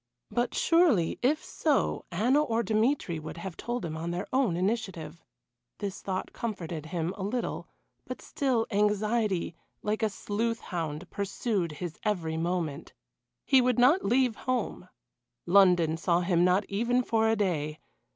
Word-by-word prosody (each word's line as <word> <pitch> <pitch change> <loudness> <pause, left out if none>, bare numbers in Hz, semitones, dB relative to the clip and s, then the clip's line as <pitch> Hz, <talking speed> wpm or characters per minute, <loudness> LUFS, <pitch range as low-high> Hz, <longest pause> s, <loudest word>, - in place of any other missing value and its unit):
But 240 0 0
surely, 330 - +3
if 290 +5 +1
so, 300 -4 0
Anna 245 - +3
or 230 -5 0
Dmitry 215 - +1
would 155 +2 -8
have 175 0 -6
told 240 -5 -3
him 160 -1 -4
on 165 +1 -4
their 175 +2 -3
own 255 -10 +2
initiative. 180 -5 -2 0.5
This 200 -2 -5
thought 190 -1 -4
comforted 170 -9 -4
him 170 +1 -2
a 205 - -8
little, 230 +5 -3 0.4
but - - -5
still 255 -6 0
anxiety 210 -2 +1 0.3
like 215 +1 -1
a 220 - +2
sleuth 225 +3 -2
hound 165 -1 -4
pursued 200 -3 -2
his 160 +1 -6
every 175 -7 -1
moment. 165 -3 -2 0.5
He 265 -2 +5
would 250 -1 +2
not 270 +10 +5
leave 245 +1 +2
home 255 -1 -3 0.6
London 175 -4 +5
saw 170 +1 +2
him 175 -1 +2
not 180 +3 +3
even 235 +5 +1
for 225 -1 +2
a 225 - +3
day. 155 -7 -1
200 Hz, 150 wpm, -29 LUFS, 170-235 Hz, 0.6 s, He